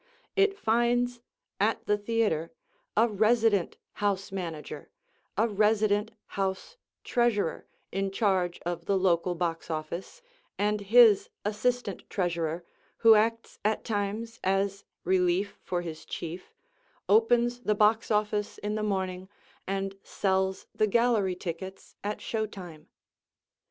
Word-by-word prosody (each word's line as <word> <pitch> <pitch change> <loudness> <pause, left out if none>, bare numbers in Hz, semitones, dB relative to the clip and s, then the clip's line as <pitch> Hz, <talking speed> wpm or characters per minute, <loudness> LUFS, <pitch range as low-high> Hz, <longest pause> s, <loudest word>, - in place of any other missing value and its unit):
It 395 0 +3
finds 240 - +1 0.4
at - - +1
the 210 - +3
theatre 205 -7 0 0.5
a 225 +2 +6
resident 215 -2 +2 0.2
house 200 -1 0
manager, 170 -5 -6 0.5
a 225 - +3
resident 210 0 +2 0.2
house 195 - -3 0.3
treasurer, 235 -8 0 0.2
in 195 +1 -1
charge 190 -3 +1
of 170 -1 -3
the 200 - +2
local 180 -1 +2
box 165 -1 -2
office, 165 - -5 0.3
and 210 +1 +1
his 220 0 +6 0.2
assistant 215 -1 -1
treasurer, 170 -3 -1 0.3
who 225 -1 +7
acts 230 +2 +1
at 215 +1 +1
times 215 +2 -3
as 195 +1 0 0.2
relief 185 +2 +1
for 175 -1 -2
his 160 -2 -7
chief, 170 +2 -6 0.6
opens 240 +3 +4
the 215 -3 0
box 215 +2 +3
office 210 -1 0
in 210 0 -3
the 215 - -1
morning, 190 -2 -2 0.4
and 195 0 -3
sells 190 -1 0
the 215 - +2
gallery 220 -4 +2
tickets 185 +2 -7
at 205 +1 -3
show 220 -1 -2
time. 175 -6 -10
200 Hz, 120 wpm, -28 LUFS, 185-220 Hz, 0.6 s, who